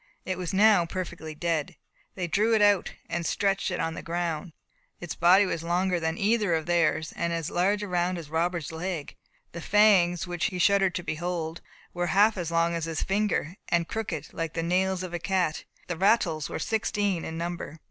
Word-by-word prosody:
It 185 -1 -3
was 180 0 -3
now 200 -3 +5
perfectly 170 -3 -5
dead. 160 -2 -1 0.4
They 185 - -2
drew 215 +7 +2
it 215 - +2
out, 205 -2 +3
and 170 0 -2
stretched 195 +3 0
it - - -3
on 165 - -1
the - - -6
ground. 170 0 -3 0.5
Its 175 - -5
body 185 +4 +5
was 170 -3 -2
longer 175 +2 0
than 160 0 -2
either 205 -4 +2
of 160 -1 -2
theirs, 165 -2 +1
and 170 0 -1
as 165 -2 -3
large 200 +4 +1
around 180 -2 0
as 165 -3 -7
Robert's 165 0 -1
leg. 165 -2 -4 0.4
The 170 - -7
fangs, 190 -4 +4
which 175 -2 -2
he 190 -4 -2
shuddered 195 0 +3
to 175 - -3
behold, 165 0 -3 0.3
were 175 0 -1
half 205 +6 +4
as 175 -4 -3
long 170 0 +1
as 165 -1 -2
his 165 -2 -2
finger, 195 -4 0
and 170 -1 +1
crooked, 185 -10 -4
like 165 -1 -3
the 165 - -1
nails 185 +2 +1
of 180 -2 -6
a 175 - -2
cat, 180 -3 -1 0.2
and - - -31
the 175 - -2
rattles 175 -8 +2
were - - -4
sixteen 205 -2 -1
in 160 - -5
number. 170 -2 -5
175 Hz, 200 wpm, -27 LUFS, 165-190 Hz, 0.5 s, now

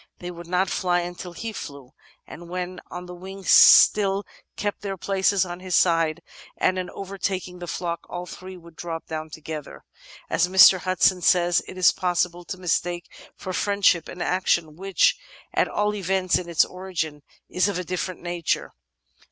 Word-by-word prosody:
They 180 0 -7
would 170 -1 -10
not 180 +2 +1
fly 175 -2 +1
until 175 0 -7
he 225 +6 -6
flew, 140 -8 -9 0.3
and 170 +2 -11
when 180 0 -5
on 180 0 -7
the 180 - -9
wing 190 +2 -10
still 200 +1 +6 0.3
kept 205 -1 -3
their 195 -1 -4
places 195 +1 +1
at 175 0 -7
his 185 -1 -1
side, 165 -1 +2 0.3
and 185 0 +1
on 180 - -4
overtaking 190 -2 -4
the 175 - -7
flock 170 0 -4
all 175 0 -5
three 185 +1 -10
would 170 -1 -16
drop 165 -1 -6
down 155 0 -5
together." 155 -1 -8 0.4
As 180 - +1
Mr. 190 0 +7
Hudson 185 0 +2
says, 175 0 +3
it 185 - -9
is 185 - +6
possible 175 -1 -1
to 185 - -6
mistake 175 -1 -2 0.2
for 185 -2 -6
friendship 200 -4 +2
an 180 - -5
action 175 -4 0
which, 195 - +2 0.3
at - - +2
all 210 0 0
events 190 -2 0
in 175 -1 -2
its 170 - +4
origin, 170 -5 -5 0.3
is 180 +1 +1
of 200 - -2
a 180 - -3
different 180 0 -4
nature. 175 -2 -2
180 Hz, 170 wpm, -24 LUFS, 175-190 Hz, 0.4 s, Mr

